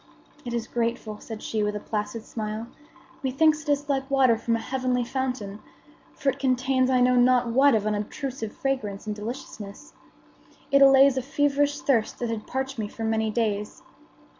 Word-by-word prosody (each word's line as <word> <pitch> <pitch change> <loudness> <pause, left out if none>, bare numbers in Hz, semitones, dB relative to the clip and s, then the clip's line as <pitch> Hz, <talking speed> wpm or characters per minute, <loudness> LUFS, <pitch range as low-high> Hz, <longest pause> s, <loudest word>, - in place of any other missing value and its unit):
"It 240 - -5
is 235 -1 -2
grateful," 230 -3 -3
said 220 -2 -8
she 220 - -2
with 210 0 0
a - - -2
placid 215 +1 -4
smile. 215 0 -4 0.6
"Methinks 300 +4 +2
it 305 - -8
is 290 0 +1
like 270 -1 -1
water 265 -4 +4
from 230 +1 -1
a - - -1
heavenly 255 0 -1
fountain; 245 -5 -3 0.6
for 275 - 0
it 270 +1 -3
contains 260 0 +2
I 255 -1 +3
know 250 0 +4
not 245 -1 +4
what 265 +2 +5
of 210 -1 0
unobtrusive 220 +3 -3
fragrance 255 -10 -3
and 210 -1 -3
deliciousness. 210 -2 -8 0.8
It 275 0 +5
allays 270 0 +7
a - - +1
feverish 290 +1 +1
thirst 230 -6 +1
that 240 -2 -2
had 220 -2 -5
parched 265 -1 -3
me 210 - -2
for 225 - -8
many 220 0 0
days. 210 -2 -2
245 Hz, 175 wpm, -26 LUFS, 220-270 Hz, 0.8 s, allays